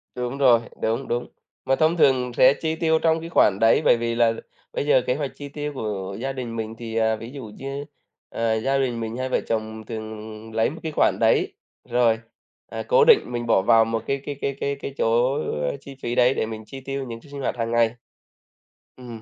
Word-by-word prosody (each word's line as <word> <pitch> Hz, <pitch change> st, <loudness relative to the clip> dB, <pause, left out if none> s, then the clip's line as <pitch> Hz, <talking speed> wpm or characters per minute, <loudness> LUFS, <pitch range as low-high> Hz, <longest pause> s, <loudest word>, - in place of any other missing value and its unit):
Đúng 125 Hz, +2 st, -3 dB
rồi, 125 Hz, -4 st, +5 dB, 0.2 s
đúng, 115 Hz, +4 st, -1 dB
đúng. 120 Hz, +1 st, -2 dB, 0.4 s
Mà 135 Hz, -, +3 dB
thông 160 Hz, +4 st, +2 dB
thường 130 Hz, -5 st, +3 dB
sẽ 130 Hz, +1 st, +7 dB
chi 160 Hz, +2 st, -2 dB
tiêu 160 Hz, -1 st, +2 dB
trong 160 Hz, 0 st, +2 dB
cái 165 Hz, +1 st, -7 dB
khoản 100 Hz, -, +4 dB
đấy, 115 Hz, 0 st, +5 dB
bởi -, -, +6 dB
vì 115 Hz, 0 st, -2 dB
là 115 Hz, -1 st, +3 dB, 0.4 s
bây -, -, -2 dB
giờ 140 Hz, -3 st, +4 dB
kế 125 Hz, -, +2 dB
hoạch 140 Hz, -1 st, -3 dB
chi 145 Hz, -1 st, -8 dB
tiêu 150 Hz, +1 st, -4 dB
của 100 Hz, -6 st, -4 dB
gia 135 Hz, +2 st, -3 dB
đình 125 Hz, -3 st, -5 dB
mình 110 Hz, 0 st, -4 dB
thì, 115 Hz, -1 st, -6 dB
à, 110 Hz, -1 st, +2 dB
ví 115 Hz, +2 st, -9 dB
dụ 140 Hz, -2 st, -8 dB
như, 135 Hz, +1 st, -5 dB, 0.4 s
ờ, 115 Hz, -1 st, 0 dB
gia 135 Hz, +4 st, +1 dB
đình 125 Hz, -3 st, 0 dB
mình 115 Hz, +1 st, -4 dB
hai 130 Hz, 0 st, -2 dB
vợ -, -, +1 dB
chồng 110 Hz, -1 st, -3 dB
thường 110 Hz, 0 st, -8 dB
lấy 110 Hz, 0 st, +2 dB
một 160 Hz, -, -9 dB
cái 160 Hz, -, -3 dB
khoản -, -, +3 dB
đấy, -, -, +3 dB, 0.4 s
rồi, 120 Hz, -2 st, +3 dB, 0.5 s
à, -, -, -5 dB
cố -, -, +4 dB
định 465 Hz, -3 st, +8 dB
mình 120 Hz, -1 st, -3 dB
bỏ 110 Hz, -, +4 dB
vào 115 Hz, +3 st, +5 dB
một 115 Hz, 0 st, -2 dB
cái 140 Hz, 0 st, -1 dB
cái 145 Hz, -, -4 dB
cái 140 Hz, -, -1 dB
cái 140 Hz, 0 st, -1 dB
cái 140 Hz, 0 st, -7 dB
chỗ, 120 Hz, +3 st, +2 dB
ơ, 75 Hz, -, -2 dB
chi 140 Hz, 0 st, -11 dB
phí 120 Hz, 0 st, -2 dB
đấy 125 Hz, +1 st, +4 dB
để -, -, -1 dB
mình 110 Hz, 0 st, -7 dB
chi 135 Hz, +5 st, -9 dB
tiêu 135 Hz, 0 st, -4 dB
những 115 Hz, -1 st, -7 dB
ch -, -, -24 dB
sinh 140 Hz, -1 st, -6 dB
hoạt 130 Hz, -, -2 dB
hằng 115 Hz, -1 st, -2 dB
ngày. 115 Hz, 0 st, +2 dB, 1.0 s
Ừm. 120 Hz, -3 st, -9 dB
120 Hz, 230 wpm, -24 LUFS, 115-140 Hz, 1.0 s, định